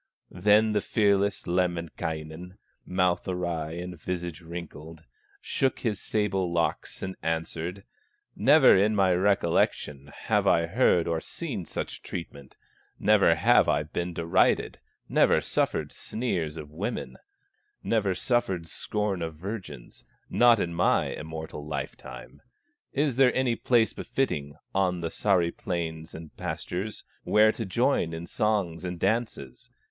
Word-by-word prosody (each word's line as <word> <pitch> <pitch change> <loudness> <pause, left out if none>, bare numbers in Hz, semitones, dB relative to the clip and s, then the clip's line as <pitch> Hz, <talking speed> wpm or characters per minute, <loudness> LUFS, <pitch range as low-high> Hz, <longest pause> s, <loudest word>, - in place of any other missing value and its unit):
Then 105 +4 +4
the 105 - +2
fearless 100 -2 +1
Lemminkainen, 85 -1 -3 0.3
Mouth 90 -1 +1
awry 85 -4 -2
and 90 -1 -7
visage 85 -1 -4
wrinkled, 80 -1 -9 0.4
Shook 135 -1 -1
his 110 -4 -1
sable 95 -4 0
locks 85 -1 -2
and 95 0 -4
answered: 80 +3 -3 0.5
"Never 145 +9 +6
in 105 +3 +3
my 95 -2 +4
recollection 85 -6 +1
Have - - -1
I 85 - +4
heard 90 -3 +3
or 85 -1 -1
seen - - -5
such - - -5
treatment, 70 -6 -8 0.4
Never - - +4
have - - +4
I - - +2
been 85 +3 -4
derided, 85 0 +1 0.3
Never - - +4
suffered - - -1
sneers 85 -10 -3
of 75 -2 -8
women, 75 - -4 0.7
Never 100 -5 +1
suffered 95 -5 0
scorn 100 +3 -3
of 80 -1 -4
virgins, 95 - -8 0.3
Not 120 -2 +5
in 85 -3 -1
my 85 - +2
immortal 80 -1 -7
life 70 -2 -4
time. - - -11 0.5
Is 140 -3 0
there 135 -2 +5
any 130 -2 +2
place 115 -1 +2
befitting 75 - -2 0.2
On 90 -2 +1
the 85 - -2
Sahri 90 -5 +1
plains 80 -5 -4
and 80 -1 -10
pastures, 95 +5 -4 0.2
Where 110 +1 +5
to 110 -2 -5
join 105 -4 +1
in 80 +1 -5
songs 95 -5 -1
and 90 -1 -4
dances? 105 - -2
90 Hz, 130 wpm, -27 LUFS, 80-105 Hz, 0.7 s, Never